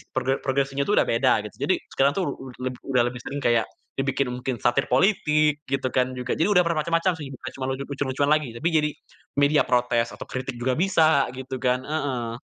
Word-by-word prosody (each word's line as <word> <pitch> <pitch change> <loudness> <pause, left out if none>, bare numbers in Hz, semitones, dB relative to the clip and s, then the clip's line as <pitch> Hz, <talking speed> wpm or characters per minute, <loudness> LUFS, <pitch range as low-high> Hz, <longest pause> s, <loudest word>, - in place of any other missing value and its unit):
progre 135 +1 0
progressing-nya 135 +1 0
tuh 210 - +2
udah - - +4
beda 115 -3 +2
gitu, - - -16
jadi - - +4 0.2
sekarang 135 +1 +3
tuh 175 -8 -1
ud 130 -2 -10
leb 130 0 -2
udah 125 -3 +2
lebih 125 0 -6
sering 145 +1 -4
kayak 120 -1 +3 0.3
dibikin 135 0 0
mungkin 125 0 -3
satir 120 +2 +1
politik 150 -2 +3
gitu 135 -1 0
kan 130 0 +2
juga. 125 0 -2
Jadi 165 - +2
udah 180 -2 +5
bermacam-macam 165 +3 +1
sih, 140 -2 -6
bukan - - -7
cuma 130 - -3
lucu 135 +1 -3
lucu-lucuan 140 0 -1
lagi. 150 -6 0
Tapi 160 +8 -1
jadi 150 -1 +3 0.5
media 145 +1 +4
protes 120 -1 +1
atau - - -8
kritik 130 -1 -5
juga 125 +1 0
bisa 160 -8 +3
gitu 130 0 -6
kan, 125 0 +1
heeh. 130 -6 -3
135 Hz, 200 wpm, -24 LUFS, 125-150 Hz, 0.5 s, udah